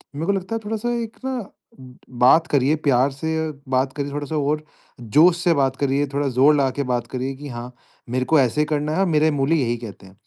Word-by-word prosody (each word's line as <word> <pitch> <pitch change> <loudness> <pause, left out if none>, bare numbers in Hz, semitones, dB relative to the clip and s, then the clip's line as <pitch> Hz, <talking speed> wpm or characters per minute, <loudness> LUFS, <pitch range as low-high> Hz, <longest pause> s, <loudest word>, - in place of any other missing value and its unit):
मेरे 155 +3 -3
को 200 - +2
लगता 195 +3 -3
है 225 - -2
थोड़ा-सा 220 +2 -2
एक 225 -1 -7
ना, 255 -6 -4 0.6
बात 130 +6 +4
करिए 145 +1 +2
प्यार 135 +1 +3
से 160 +3 -2 0.2
बात 130 +1 0
करिए 140 -1 -4
थोड़ा-सा 145 +2 -4
और 150 +1 0 0.4
जोश 155 +10 +4
से 175 0 +2
बात 135 -3 +1
करिए, 140 +1 0
थोड़ा 140 +1 -2
ज़ोर 135 +4 +4
लगाके 140 0 0
बात 120 -1 -2
करिए 130 +1 -4
कि 145 +2 -9
हाँ, 120 +1 -7 0.4
मेरे 130 +1 -1
को 155 +4 +4
ऐसे 135 +3 +2
करना 150 0 -1
है 185 - -1
और 195 - +3
मेरे 155 -2 +2
मूल्य 145 +2 +1
यही 120 -6 0
कहते 110 -4 -10
हैं। 95 - -16
145 Hz, 215 wpm, -22 LUFS, 130-160 Hz, 0.6 s, बात